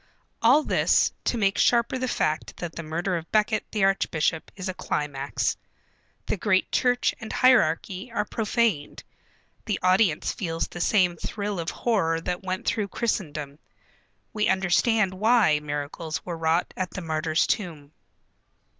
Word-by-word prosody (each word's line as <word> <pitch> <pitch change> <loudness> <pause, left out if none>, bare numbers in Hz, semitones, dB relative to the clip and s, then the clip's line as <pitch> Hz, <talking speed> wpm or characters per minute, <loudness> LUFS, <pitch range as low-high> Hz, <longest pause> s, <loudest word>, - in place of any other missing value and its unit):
All 260 +7 +5
this, - - +3
to 240 - 0
make 195 -2 +1
sharper 240 +2 +3
the 255 - -1
fact 155 -8 -1
that 175 -2 -6
the - - -4
murder 170 +4 -2
of 165 0 -9
Becket 215 0 +2
the 210 -3 0
archbishop 165 -4 0
is 190 -1 -5
a 185 - -2
climax. 145 -5 -2 0.7
The - - -1
great 190 -1 +1
Church 245 -1 +2
and 220 - -6
hierarchy 200 -3 +2
are 210 -2 -1
profaned. 215 -9 -1 0.6
The 210 -3 -1
audience 185 -3 +3
feels 165 -4 -3
the 175 - -7
same 180 -3 +2
thrill 205 +2 -4
of 165 - -2
horror 185 -9 0
that 180 +1 -3
went 185 -1 -4
through 210 -2 0
Christendom. 155 -10 -3 0.7
We 210 -1 +1
understand 190 +2 +2
why 210 -6 +3
miracles 150 +2 -5
were 175 - -4
wrought 165 +1 0
at 185 -1 -2
the 185 - -6
martyr's 160 -1 0
tomb. 160 -8 -3
185 Hz, 145 wpm, -25 LUFS, 160-215 Hz, 0.7 s, All